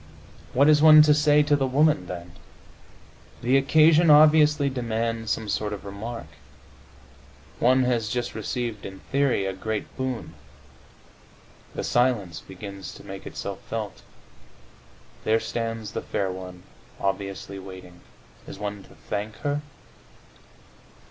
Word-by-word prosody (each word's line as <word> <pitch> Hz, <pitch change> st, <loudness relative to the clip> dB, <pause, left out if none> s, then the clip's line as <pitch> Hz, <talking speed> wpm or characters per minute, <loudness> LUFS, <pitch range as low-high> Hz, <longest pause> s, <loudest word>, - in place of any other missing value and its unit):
What 140 Hz, +3 st, +4 dB
is 150 Hz, -1 st, +5 dB
one 155 Hz, -1 st, +9 dB
to 150 Hz, 0 st, +5 dB
say 150 Hz, 0 st, +4 dB
to 145 Hz, 0 st, +3 dB
the 135 Hz, -2 st, 0 dB
woman 140 Hz, -, +2 dB
then? 85 Hz, -1 st, -7 dB, 1.1 s
The 125 Hz, +3 st, +3 dB
occasion 155 Hz, +4 st, +5 dB
obviously 150 Hz, -1 st, +6 dB
demands 115 Hz, -3 st, -2 dB
some 110 Hz, 0 st, -1 dB
sort 105 Hz, +1 st, -2 dB
of 100 Hz, -, -8 dB
remark. 105 Hz, +2 st, -6 dB, 1.3 s
One 130 Hz, +2 st, +4 dB
has 120 Hz, -4 st, 0 dB
just 120 Hz, +1 st, -2 dB
received 115 Hz, -1 st, -4 dB
(in 95 Hz, 0 st, -9 dB
theory) 140 Hz, -7 st, +2 dB
a 95 Hz, -, -2 dB
great 110 Hz, +3 st, -5 dB
boon; 130 Hz, -2 st, -4 dB, 1.4 s
the -, -, -3 dB
silence 115 Hz, -9 st, +1 dB
begins 100 Hz, 0 st, -9 dB
to -, -, -13 dB
make 95 Hz, -1 st, -8 dB
itself -, -, -6 dB
felt; -, -, -5 dB, 1.2 s
there 110 Hz, +1 st, +2 dB
stands 115 Hz, -2 st, -4 dB
the -, -, -4 dB
fair 95 Hz, -2 st, -2 dB
one, 90 Hz, -1 st, -9 dB, 0.4 s
obviously 100 Hz, 0 st, -3 dB
waiting. 95 Hz, -2 st, -11 dB, 0.5 s
Is -, -, -8 dB
one 105 Hz, 0 st, -5 dB
to -, -, -18 dB
thank 105 Hz, +1 st, -3 dB
her? 145 Hz, 0 st, -1 dB
115 Hz, 130 wpm, -25 LUFS, 100-140 Hz, 1.4 s, one